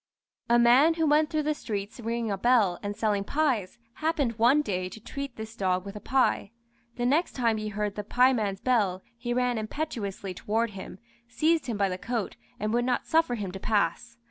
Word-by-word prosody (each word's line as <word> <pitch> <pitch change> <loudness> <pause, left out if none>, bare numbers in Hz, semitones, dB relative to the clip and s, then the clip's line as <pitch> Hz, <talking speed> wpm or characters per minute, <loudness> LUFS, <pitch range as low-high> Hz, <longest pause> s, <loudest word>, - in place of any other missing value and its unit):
A 235 - +5
man 255 +7 +5
who 325 -1 +1
went 300 +1 +3
through 310 -1 0
the 305 +1 +1
streets 210 -5 -5
ringing 230 -1 -2
a 195 - -1
bell 220 -6 +3
and 205 0 -4
selling 205 -3 +1
pies, 245 -7 0 0.2
happened 290 -8 -1
one 265 +6 +5
day 185 -7 -2
to 205 - -10
treat 275 +2 -6
this 220 +1 -8
dog 185 -2 0
with 200 +1 -8
a - - -5
pie. 260 -4 +1 0.5
The 240 - -2
next 300 +8 +2
time 230 -4 +1
he 215 0 -4
heard 210 0 -2
the 210 - -5
pieman's 220 -4 +2
bell 205 -7 +1
he 240 +1 -5
ran 245 -1 +1
impetuously 215 -6 -4
toward 225 +4 -1
him, 190 -1 -9 0.3
seized 315 +3 +1
him 230 -4 -2
by 200 -1 +2
the 185 -1 -4
coat, 235 -2 -3 0.2
and 215 +1 -1
would 240 +1 +2
not 250 - 0
suffer 320 -6 +2
him 200 -5 -4
to 195 - -7
pass. 215 +3 -1
230 Hz, 200 wpm, -27 LUFS, 205-255 Hz, 0.5 s, A